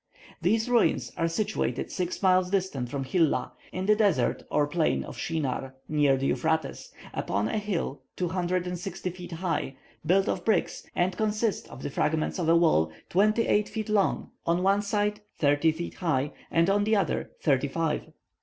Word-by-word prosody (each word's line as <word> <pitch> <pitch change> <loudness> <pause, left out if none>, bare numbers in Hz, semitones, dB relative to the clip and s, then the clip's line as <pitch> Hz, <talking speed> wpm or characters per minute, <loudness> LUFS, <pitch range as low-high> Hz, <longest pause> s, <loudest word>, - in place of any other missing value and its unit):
These 220 +6 +2
ruins 245 -2 +2
are 165 - +1
situated 165 - -1
six 180 +1 -3
miles 185 -1 +4
distant 180 -11 -1
from 140 0 -3
Hilla, 140 -2 +1 0.2
in 185 +1 -3
the 210 +1 +5
desert 210 -2 +2
or 150 - +2
plain 155 +2 +1
of - - -9
Shinar, 135 -4 -3
near 145 -3 +3
the 135 - -2
Euphrates, 160 +2 -1 0.2
upon 105 +1 -1
a 215 - -1
hill 190 -9 -3
265 180 0 -2
feet 180 -1 -9
high, 165 -5 -2 0.3
built 190 +5 +3
of 180 - -1
bricks, 215 -4 0
and 180 +1 +1
consist 215 +1 0
of - - -10
the - - -3
fragments 155 +5 0
of 165 -2 0
a 165 - +6
wall 120 - +3 0.2
twenty 215 +5 +3
eight 210 0 +2
feet 215 -1 -4
long, 205 -2 +1
on 170 +2 +1
one 195 +1 +3
side 210 0 -1 0.2
thirty 145 +2 +3
feet 170 +2 -5
high, 150 -5 0 0.2
and 165 +1 +3
on 205 +1 +3
the 215 +1 +2
other 195 -5 0
thirty 140 -1 +2
five. 160 +2 -2
175 Hz, 170 wpm, -27 LUFS, 155-200 Hz, 0.3 s, a